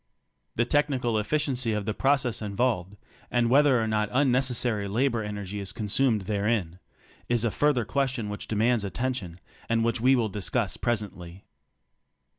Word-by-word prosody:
The 120 - +2
technical 130 -5 +1
efficiency 125 0 -1
of 105 -2 -2
the 110 - -1
process 130 -2 +1
involved, 105 -2 -1 0.3
and 120 -1 +1
whether 140 -2 +5
or 110 - 0
not 105 -1 0
unnecessary 125 -5 +1
la 115 +8 +1
bor 120 -4 -1
energy 105 -1 -5
is 100 -2 -3
consumed 110 +1 +1
therein, 100 -3 -1 0.5
is 120 -1 +2
a 115 - +1
further 145 -4 +1
question 130 -3 -1
which 105 0 -6
demands 110 +1 +1
attention, 100 -4 -3 0.3
and 115 0 +2
which 115 0 0
we 130 +2 +5
will 120 -3 +1
discuss 100 -1 -1
presently. 100 -6 -4
115 Hz, 150 wpm, -27 LUFS, 105-125 Hz, 0.5 s, whether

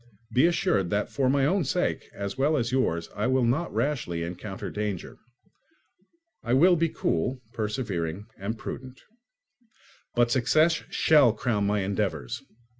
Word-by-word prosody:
Be 130 +6 +5
assured 170 - +1
that 100 +2 0
for 135 -2 +1
my 135 0 +3
own 185 +5 +2
sake, - - -1
as 100 -1 -5
well 145 +4 +2
as 120 -2 -1
yours, 85 -11 0
I 105 +3 0
will 130 0 +2
not 145 +9 0
rashly 115 - -1
encounter 90 +4 -6
danger. 105 -4 -4 1.2
I 120 - 0
will 175 +6 +6
be 165 0 +1
cool, 125 - -1
persevering, 105 -5 -3
and 105 +4 -4
prudent. 130 +3 -7 1.2
But 120 -1 +3
success 155 +7 +3
shall 145 -8 +5
crown 105 -3 0
my 105 0 +1
endeavours. 95 -10 -2
120 Hz, 140 wpm, -27 LUFS, 100-140 Hz, 1.2 s, will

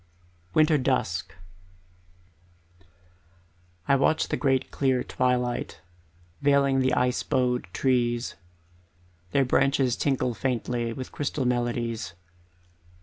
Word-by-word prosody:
Winter 155 -1 +4
Dusk 95 -10 -1 2.5
I 140 - +5
watch 140 +3 +2
the - - 0
great 135 -2 0
clear 130 -2 +1
twilight 125 +1 -1 0.6
Veiling 140 -1 +3
the 130 0 +2
ice 125 0 +1
bowed 125 -4 0
trees; 120 0 0 1.0
Their 135 +7 +2
branches 135 -1 +2
tinkle 130 -3 0
faintly 120 -1 -2
With 130 +2 -7
crystal 145 -2 -2
melodies. 120 -5 -1
125 Hz, 90 wpm, -26 LUFS, 120-135 Hz, 2.5 s, I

